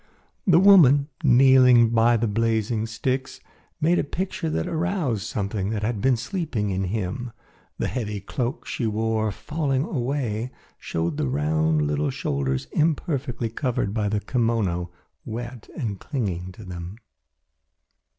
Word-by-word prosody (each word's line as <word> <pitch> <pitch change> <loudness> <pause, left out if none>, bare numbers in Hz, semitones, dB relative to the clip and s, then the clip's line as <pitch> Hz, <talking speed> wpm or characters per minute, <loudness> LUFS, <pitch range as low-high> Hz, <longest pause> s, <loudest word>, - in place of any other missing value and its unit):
The 175 -3 +6
woman, 160 -7 +6
kneeling 125 -3 +6
by 115 +1 +4
the 115 - 0
blazing 110 0 0
sticks, 130 +4 -3 0.4
made 170 +3 +3
a - - +1
picture 170 +1 -3
that 80 - -1
aroused 160 - -1
something 100 -1 -2
that 105 -1 -2
had 110 -2 -1
been 130 -1 +3
sleeping 125 - -2
in 95 +1 -1
him. 110 +5 -3 0.5
The - - -1
heavy 105 -5 -3
cloak 125 - -3
she 120 -7 -2
wore, 110 0 0
falling 135 +5 -1
away, 125 -5 -2 0.3
showed 80 -2 -2
the - - 0
round 75 +3 +1
little 75 0 0
shoulders 65 -1 -2
imperfectly 140 -6 0
covered 115 -5 -1
by 105 -2 0
the 105 0 -1
kimono, 110 -9 0 0.3
wet 120 +1 -7
and 105 - -3
clinging 95 - -3
to 110 - -12
them. 90 +1 -7
115 Hz, 135 wpm, -24 LUFS, 100-135 Hz, 0.5 s, The